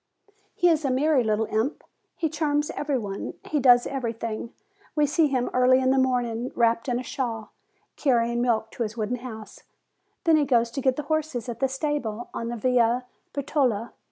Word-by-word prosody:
He 355 - +3
is 320 -2 +3
a 275 - +1
merry 270 +1 +3
little 220 0 +1
imp. 220 +7 -1 0.3
He 325 - 0
charms 295 -1 0
every 290 -2 -1
one. 200 -4 -5
He 300 - 0
does 245 -2 +6
everything. 230 -3 -4 0.4
We 300 -1 +4
see 310 +2 +3
him 255 -3 -1
early 255 +1 +5
in 260 0 +2
the 265 - +3
morning, 245 -2 0
wrapped 230 +1 +2
in 245 0 0
a - - -5
shawl, 230 -5 -4 0.5
carrying 235 -3 +2
milk 225 -2 0
to - - -8
his 220 0 -2
wooden 225 +3 -1
house; 220 -3 -9 0.6
then 325 -3 +5
he 295 - +2
goes 235 -3 +2
to 275 - -3
get 260 -1 +2
the 300 - -4
horses 305 -6 -2
at 235 -1 -5
the 270 - +2
stable 265 -5 -3
on 230 - -4
the 240 0 -4
Via 245 +1 +2 0.3
Bertola. 260 -6 0
250 Hz, 185 wpm, -25 LUFS, 230-280 Hz, 0.6 s, does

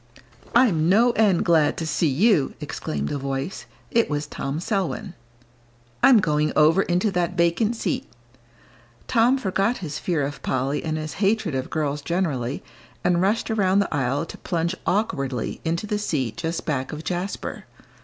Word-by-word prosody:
"I'm 180 -10 +4
no 230 +6 +5
end 210 -6 +2
glad 160 -3 +3
to 165 - -3
see 160 +1 +1
you!" 155 - +2
exclaimed 70 -1 -4
a 145 - -2
voice. 135 -1 -4 0.2
It 230 0 +2
was 145 0 -1
Tom 145 +1 -4
Selwyn. 190 -1 -2 0.9
"I'm 260 - +7
going 150 -4 +1
over 155 +5 +5
into 180 +3 +1
that 180 -1 -1
vacant 170 +7 +2
seat." 195 -7 -2 1.0
Tom 240 +3 +4
forgot 200 0 0
his 150 -6 -5
fear 165 -5 0
of 140 0 -6
Polly 135 +3 -1
and 155 -1 -2
his 155 -1 -5
hatred 200 -5 +1
of 130 -1 -2
girls 150 -2 -1
generally, 145 -7 -2 0.4
and 175 -1 +2
rushed 210 +4 +1
around 195 -3 +2
the 200 - +1
aisle 140 +2 0
to - - -10
plunge 170 0 -1
awkwardly 140 - -1
into 170 +4 -1
the 210 0 -2
seat 135 - -2
just 165 0 -3
back 135 -4 -2
of 155 0 -6
Jasper. 180 +3 -4
170 Hz, 160 wpm, -24 LUFS, 145-195 Hz, 1.0 s, I'm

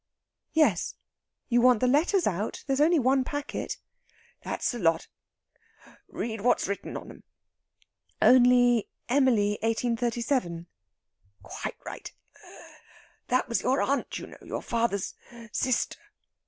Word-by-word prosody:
"Yes; 320 -1 +2 0.5
you 240 -1 +3
want 250 -2 +5
the 255 - +2
letters 315 +8 +3
out? 205 +2 -2
There's 270 0 0
only 330 +3 +5
one 265 -1 +3
packet." 290 +2 -4 0.6
"That's - - -2
the 240 - -5
lot. 165 -3 +1 1.0
Read 220 -3 -4
what's 245 -3 +2
written 200 0 -4
on - - -9
them." - - -13 1.0
"Only 245 -2 +5 0.2
'Emily, 235 -6 +3
1837.'" 230 -5 -1 0.8
"Quite - - -6
right! - - -7 1.2
That 255 +1 +1
was 235 - 0
your 265 +2 +1
aunt, 280 +1 -1
you - - -7
know - - -14
your - - -5
father's 230 -5 -1 0.4
sister. 255 +2 0
245 Hz, 115 wpm, -27 LUFS, 225-265 Hz, 1.2 s, want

